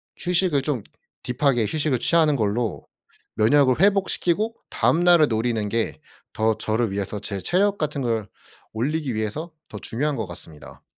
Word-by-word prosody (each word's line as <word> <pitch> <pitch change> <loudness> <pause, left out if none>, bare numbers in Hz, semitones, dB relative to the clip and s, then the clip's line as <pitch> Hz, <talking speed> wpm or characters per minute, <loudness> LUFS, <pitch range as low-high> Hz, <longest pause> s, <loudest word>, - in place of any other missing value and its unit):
휴식을 175 -5 +1
좀 135 -6 -2 0.4
딥하게 125 -2 +1
휴식을 145 -1 0
취하는 160 -3 +3
걸로 110 -1 -2 0.5
면역을 130 +5 +3
회복시키고 200 +1 +2
다음 170 +2 +1
날을 175 -3 +6
노리는 110 -2 -1
게 100 -10 -1 0.3
더 110 0 +1
저를 110 0 -1
위해서 100 +1 -3
제 100 -1 -4
체력 195 - +1
같은 150 -2 -2
걸 115 -3 -1 0.4
올리기 135 +3 -2
위해서 110 +11 -3 0.2
더 105 - -8
중요한 145 +8 -2
것 110 -5 -4
같습니다. 85 -3 -10
125 Hz, 315 characters per minute, -23 LUFS, 110-160 Hz, 0.5 s, 날을